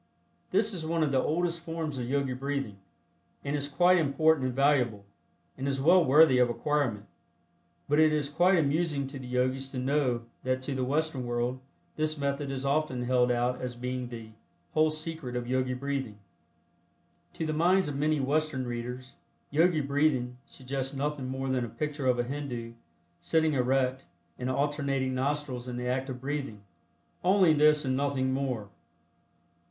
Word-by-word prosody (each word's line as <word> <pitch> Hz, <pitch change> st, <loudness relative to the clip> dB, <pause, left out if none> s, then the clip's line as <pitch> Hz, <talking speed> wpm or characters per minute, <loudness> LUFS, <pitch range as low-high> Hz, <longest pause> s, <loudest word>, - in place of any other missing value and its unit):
This 220 Hz, 0 st, +2 dB
is 175 Hz, -4 st, -4 dB
one 165 Hz, 0 st, 0 dB
of 150 Hz, -, 0 dB
the 130 Hz, -1 st, +3 dB
oldest 170 Hz, +3 st, 0 dB
forms 165 Hz, -4 st, -4 dB
of 120 Hz, 0 st, -4 dB
Yogi 140 Hz, -1 st, 0 dB
breathing, 135 Hz, -5 st, -3 dB, 0.7 s
and 140 Hz, +1 st, -1 dB
is 145 Hz, -1 st, -2 dB
quite 175 Hz, +6 st, +4 dB
important 155 Hz, -1 st, +2 dB
and 125 Hz, -, -4 dB
valuable, 125 Hz, -7 st, +2 dB, 0.5 s
and 135 Hz, +1 st, -4 dB
is 135 Hz, -1 st, -1 dB
well 175 Hz, +6 st, +5 dB
worthy 145 Hz, -2 st, +6 dB
of 125 Hz, -1 st, +4 dB
acquirement. 120 Hz, -3 st, -1 dB, 0.8 s
But 150 Hz, +1 st, +2 dB
it 155 Hz, -1 st, +6 dB
is 150 Hz, -2 st, 0 dB
quite 175 Hz, +6 st, +3 dB
amusing 150 Hz, -1 st, +1 dB
to 135 Hz, 0 st, -7 dB
the 130 Hz, -, -8 dB
Yogis 130 Hz, +2 st, 0 dB
to 135 Hz, -, -7 dB
know 130 Hz, -2 st, 0 dB, 0.2 s
that 130 Hz, 0 st, -1 dB
to 140 Hz, -, -3 dB
the 130 Hz, -1 st, -1 dB
Western 145 Hz, 0 st, -1 dB
world 120 Hz, +2 st, -1 dB, 0.4 s
this 155 Hz, 0 st, -1 dB
method 140 Hz, 0 st, -2 dB
is 135 Hz, 0 st, -4 dB
often 140 Hz, -3 st, 0 dB
held 125 Hz, 0 st, +2 dB
out 125 Hz, +1 st, 0 dB
as 125 Hz, -1 st, -4 dB
being 125 Hz, +1 st, -4 dB
the 115 Hz, -2 st, -8 dB, 0.4 s
"whole 155 Hz, 0 st, +4 dB
secret" 155 Hz, -4 st, -5 dB
of 120 Hz, -1 st, -3 dB
Yogi 130 Hz, 0 st, 0 dB
Breathing. 135 Hz, -5 st, -3 dB, 1.2 s
To 160 Hz, -, -3 dB
the 155 Hz, -, -1 dB
minds 180 Hz, +4 st, +3 dB
of 145 Hz, -, -4 dB
many 150 Hz, +2 st, +1 dB
Western 140 Hz, -1 st, 0 dB
readers, 125 Hz, +2 st, -5 dB, 0.4 s
"Yogi 160 Hz, +2 st, +3 dB
Breathing" 140 Hz, -3 st, +1 dB
suggests 135 Hz, 0 st, -5 dB
nothing 140 Hz, -1 st, -2 dB
more 130 Hz, +1 st, -3 dB
than 130 Hz, -2 st, 0 dB
a 120 Hz, -, -4 dB
picture 150 Hz, +2 st, -3 dB
of 125 Hz, -1 st, +3 dB
a 120 Hz, -, +1 dB
Hindu, 120 Hz, -3 st, -5 dB, 0.5 s
sitting 160 Hz, -1 st, +1 dB
erect, 130 Hz, 0 st, +1 dB, 0.3 s
and 125 Hz, 0 st, -2 dB
alternating 140 Hz, -1 st, 0 dB
nostrils 130 Hz, -1 st, -2 dB
in 125 Hz, -1 st, -4 dB
the 125 Hz, 0 st, -3 dB
act 130 Hz, +2 st, -1 dB
of 130 Hz, -1 st, -5 dB
breathing. 135 Hz, -6 st, -4 dB, 0.6 s
"Only 185 Hz, -2 st, +5 dB
this 150 Hz, 0 st, +4 dB
and 130 Hz, 0 st, +1 dB
nothing 135 Hz, -1 st, 0 dB
more." 130 Hz, -7 st, -2 dB
135 Hz, 170 wpm, -29 LUFS, 125-150 Hz, 1.2 s, worthy